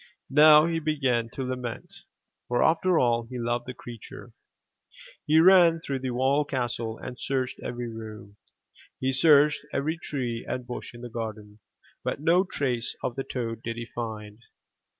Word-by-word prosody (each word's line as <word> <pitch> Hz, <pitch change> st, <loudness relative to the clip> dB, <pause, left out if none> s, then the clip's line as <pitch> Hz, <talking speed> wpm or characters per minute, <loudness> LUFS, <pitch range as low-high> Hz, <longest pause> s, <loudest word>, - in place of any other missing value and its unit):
Now 150 Hz, +2 st, +8 dB
he 165 Hz, -1 st, 0 dB
began 135 Hz, -7 st, 0 dB
to 135 Hz, -, -3 dB
lament, 125 Hz, -2 st, -5 dB, 0.5 s
for 120 Hz, 0 st, +2 dB
after 170 Hz, +2 st, +3 dB
all, 120 Hz, -3 st, +2 dB
he 125 Hz, +1 st, -7 dB
loved 120 Hz, 0 st, -2 dB
the 125 Hz, -, -6 dB
creature., 120 Hz, -3 st, -11 dB, 0.9 s
He 155 Hz, +1 st, +5 dB
ran 170 Hz, -1 st, +6 dB
through 140 Hz, -4 st, -4 dB
the 130 Hz, -, -4 dB
whole 130 Hz, +4 st, +2 dB
castle, 120 Hz, -5 st, -3 dB
and 125 Hz, 0 st, -8 dB
searched 130 Hz, -2 st, -2 dB
every 120 Hz, 0 st, -5 dB
room. 110 Hz, -3 st, -9 dB, 0.6 s
He 130 Hz, 0 st, 0 dB
searched 150 Hz, +1 st, +5 dB
every 155 Hz, +4 st, -1 dB
tree 125 Hz, -8 st, -4 dB
and 125 Hz, -, -4 dB
bush 120 Hz, 0 st, -7 dB
in 120 Hz, -, -11 dB
the 120 Hz, -, -7 dB
garden 110 Hz, -2 st, -6 dB, 0.4 s
but -, -, -2 dB
no 170 Hz, +5 st, +4 dB
trace 125 Hz, -10 st, -1 dB
of 120 Hz, -, -2 dB
the 135 Hz, -, -3 dB
toad 115 Hz, -4 st, -4 dB
did 115 Hz, 0 st, -4 dB
he 120 Hz, -, -5 dB
find. 110 Hz, -2 st, -6 dB
125 Hz, 160 wpm, -27 LUFS, 115-150 Hz, 0.9 s, Now